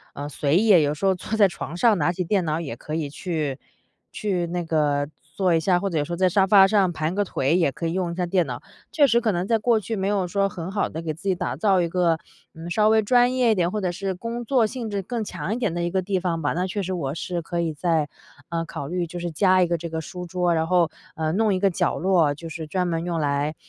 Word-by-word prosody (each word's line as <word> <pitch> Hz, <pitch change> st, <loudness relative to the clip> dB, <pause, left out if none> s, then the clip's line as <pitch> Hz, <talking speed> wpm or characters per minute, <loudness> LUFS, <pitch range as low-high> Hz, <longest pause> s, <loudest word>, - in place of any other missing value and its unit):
呃， 145 Hz, +1 st, -5 dB
随 145 Hz, +2 st, +1 dB
意， 220 Hz, +3 st, +2 dB
有 145 Hz, 0 st, +1 dB
时 195 Hz, -, -3 dB
候 190 Hz, -, +4 dB
坐 200 Hz, +4 st, -4 dB
在 205 Hz, -, +6 dB
床 175 Hz, -2 st, -7 dB
上 220 Hz, +2 st, +4 dB
拿 150 Hz, +4 st, +2 dB
起 180 Hz, +1 st, -2 dB
电 190 Hz, +1 st, +1 dB
脑 155 Hz, 0 st, -1 dB
也 140 Hz, -8 st, -5 dB
可 150 Hz, +6 st, -6 dB
以 160 Hz, -2 st, -2 dB
去 150 Hz, -4 st, -3 dB, 0.5 s
去 185 Hz, -5 st, -2 dB
那 175 Hz, +1 st, -3 dB
个 150 Hz, -3 st, +1 dB, 0.3 s
做 185 Hz, -2 st, +2 dB
一 165 Hz, -, +3 dB
下， 175 Hz, +2 st, +2 dB
或 195 Hz, -, -2 dB
者 160 Hz, -, 0 dB
有 -, -, +1 dB
时 175 Hz, -, -9 dB
候 -, -, -1 dB
在 185 Hz, +2 st, +3 dB
沙 190 Hz, +2 st, +3 dB
发 195 Hz, -1 st, +7 dB
上 195 Hz, -3 st, +3 dB
盘 155 Hz, 0 st, -2 dB
个 205 Hz, +1 st, +1 dB
腿， 150 Hz, -3 st, 0 dB
也 165 Hz, -6 st, +2 dB
可 150 Hz, -, -6 dB
以 165 Hz, -, -2 dB
用 180 Hz, -2 st, -1 dB
一 -, -, -5 dB
下 180 Hz, 0 st, -1 dB
电 175 Hz, 0 st, +1 dB
脑， 125 Hz, -2 st, -5 dB, 0.3 s
确 295 Hz, -2 st, +4 dB
实 235 Hz, -3 st, +4 dB
可 220 Hz, -3 st, +1 dB
能 175 Hz, 0 st, -1 dB
在 230 Hz, -, +3 dB
过 225 Hz, 0 st, +3 dB
去， 220 Hz, +3 st, -4 dB
没 190 Hz, -1 st, -1 dB
有 200 Hz, -3 st, 0 dB
说 195 Hz, +2 st, +1 dB
很 180 Hz, 0 st, -6 dB
好 200 Hz, 0 st, 0 dB
地 160 Hz, -, -6 dB
给 160 Hz, -1 st, -2 dB
自 165 Hz, -, -16 dB
己 190 Hz, -, +3 dB
打 -, -, -3 dB
造 195 Hz, -4 st, +2 dB
一 170 Hz, -, 0 dB
个， 170 Hz, -2 st, +1 dB, 0.3 s
嗯， 165 Hz, +2 st, -8 dB
稍 210 Hz, +4 st, +3 dB
微 220 Hz, 0 st, +4 dB
专 245 Hz, +3 st, +3 dB
业 250 Hz, -3 st, +3 dB
一 220 Hz, -, +3 dB
点， 175 Hz, -1 st, +1 dB
或 210 Hz, 0 st, -2 dB
者 180 Hz, -, 0 dB
是 190 Hz, +2 st, -3 dB
工 230 Hz, +5 st, -5 dB
作 245 Hz, -1 st, +3 dB
性 235 Hz, -1 st, -5 dB
质 200 Hz, -1 st, -1 dB
更 230 Hz, +3 st, -3 dB
强 205 Hz, -, -4 dB
一 -, -, -3 dB
点 225 Hz, -9 st, -1 dB
的 175 Hz, -, -2 dB
一 175 Hz, -, 0 dB
个 190 Hz, +2 st, 0 dB
地 190 Hz, 0 st, 0 dB
方 175 Hz, -2 st, -1 dB
吧。 145 Hz, -, +1 dB
那 180 Hz, +3 st, -1 dB
确 200 Hz, +3 st, -3 dB
实， 185 Hz, +1 st, -3 dB
我 140 Hz, -5 st, -3 dB
是 175 Hz, +1 st, -3 dB
可 170 Hz, +1 st, -4 dB
以 160 Hz, -2 st, -1 dB
再， 160 Hz, -1 st, 0 dB, 0.4 s
嗯， 165 Hz, -1 st, -2 dB
考 140 Hz, -, -6 dB
虑 175 Hz, +1 st, -2 dB
就 175 Hz, +2 st, -8 dB
是 175 Hz, -1 st, -4 dB
加 185 Hz, +2 st, +4 dB
一 175 Hz, -, +1 dB
个 170 Hz, -, 0 dB
这 170 Hz, -, -5 dB
个 160 Hz, 0 st, -3 dB
书 180 Hz, +2 st, -7 dB
桌， 180 Hz, 0 st, +1 dB
然 160 Hz, 0 st, 0 dB
后， 175 Hz, -3 st, +2 dB, 0.2 s
呃， 160 Hz, -1 st, -1 dB
弄 210 Hz, +2 st, +2 dB
一 -, -, -1 dB
个 195 Hz, 0 st, +3 dB
角 -, -, 0 dB
落， 170 Hz, -6 st, +2 dB
就 165 Hz, +3 st, -9 dB
是 160 Hz, -1 st, -6 dB
专 180 Hz, +2 st, -1 dB
门 165 Hz, -1 st, -1 dB
用 170 Hz, -1 st, -2 dB
来 145 Hz, +1 st, 0 dB
180 Hz, 310 characters per minute, -24 LUFS, 165-195 Hz, 0.5 s, 发